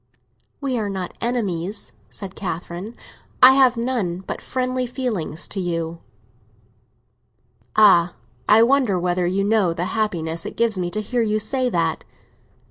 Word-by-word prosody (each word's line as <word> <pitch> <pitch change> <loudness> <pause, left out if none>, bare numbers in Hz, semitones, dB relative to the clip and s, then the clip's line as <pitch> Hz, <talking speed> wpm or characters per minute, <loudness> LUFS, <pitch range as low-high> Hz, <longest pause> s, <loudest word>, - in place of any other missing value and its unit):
"We 265 -4 -1
are 210 -2 -2
not 190 -2 -5
enemies," 205 -5 -2 0.2
said 195 -2 -8
Catherine. 175 +3 -5 0.5
"I 255 - +11
have 260 -2 +4
none 230 -8 -1
but - - -5
friendly 255 0 -2
feelings 230 - -3
to 195 - -3
you." 165 -2 -3 1.8
"Ah, 180 -5 +5 0.3
I 220 +2 +7
wonder 245 -7 +3
whether 175 0 0
you 190 +2 0
know 205 -4 +2
the 170 +2 -3
happiness 170 -7 -1
it - - -7
gives 230 -2 +2
me 175 -1 -1
to 215 +4 -2
hear 240 +3 -1
you 215 -1 +1
say 250 +4 0
that!" 165 -6 -1
205 Hz, 140 wpm, -22 LUFS, 175-240 Hz, 1.8 s, I